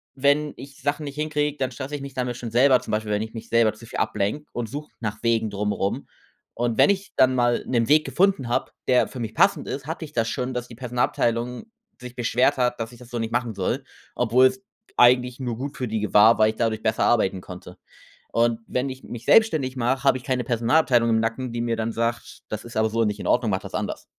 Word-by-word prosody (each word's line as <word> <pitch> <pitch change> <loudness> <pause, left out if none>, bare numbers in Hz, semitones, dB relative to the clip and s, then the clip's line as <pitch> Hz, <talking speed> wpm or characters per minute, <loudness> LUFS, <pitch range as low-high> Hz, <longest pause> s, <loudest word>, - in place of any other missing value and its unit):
wenn 145 +2 +2
ich 135 -1 -12
Sachen 145 +2 -1
nicht 140 0 -7
hinkriege, 150 -1 -1
dann 130 -2 -1
stresse 135 +4 -6
ich 145 - -6
mich 140 0 -8
damit 125 -2 -3
schon 115 -2 -6
selber 130 +2 +5
zum - - -7
Beispiel, 105 0 -1
wenn 105 0 0
ich 110 +1 -6
mich 115 0 -8
selber 115 -2 +3
zu 110 +2 -14
viel - - -6
ablenke 105 +10 -1
und 120 -2 -4
suche 145 +5 -7
nach 110 -3 -4
Wegen 115 -2 +1
drumrum. 100 -1 -2 0.5
Und 120 -1 -1
wenn - - +6
ich 200 0 -1
dann 130 0 +5
mal 120 -1 +2
'nen 120 -1 +1
Weg 155 +1 +5
gefunden 190 -9 +1
habe, 120 - -1 0.2
der 125 -1 +4
für 130 - -8
mich 115 -3 -4
passend - - +2
ist, 135 0 -5
hatte 160 0 -4
ich 150 - -14
das 115 -1 0
schon, 130 0 -3
dass 125 0 -4
die 120 - -10
Personalabteilung 125 - -1 0.3
sich 125 0 -10
beschwert 125 +3 +2
hat, 125 -1 0
dass 115 0 -4
ich 120 - -14
das 125 -1 -14
so 120 - -4
nicht 115 0 -3
machen 120 -2 -1
soll, - - -2 0.3
obwohl's 130 - +3 0.4
eigentlich 125 +1 +4
nur 120 -3 -3
gut 140 +3 -6
für 125 - -2
die 110 0 -2
g 105 - -3
war, 110 +3 +7
weil 110 0 +4
ich 110 - -4
dadurch 110 -1 -1
besser 110 0 +1
arbeiten 95 -5 +2
konnte. 90 0 -11 0.6
Und 115 0 +2
wenn 130 +2 -1
ich 130 0 -9
mich 120 -1 -8
selbstständig 155 - +3
mache, 125 +2 0
habe 135 -2 +4
ich 125 - -12
keine 130 -2 0
Personalabteilung 120 +1 +2
im 110 - +3
Nacken, 115 +2 -3
die 120 - -2
mir 115 -1 -1
dann 115 +1 -2
sagt: 115 +1 -3
„Das 110 +1 -5
ist 120 - -11
aber 110 0 +2
so 115 0 +1
nicht 105 0 -2
in - - -4
Ordnung, 120 -3 +2
mache 95 - -1
das - - -9
anders.‟ - - -4
120 Hz, 240 wpm, -24 LUFS, 115-130 Hz, 0.6 s, war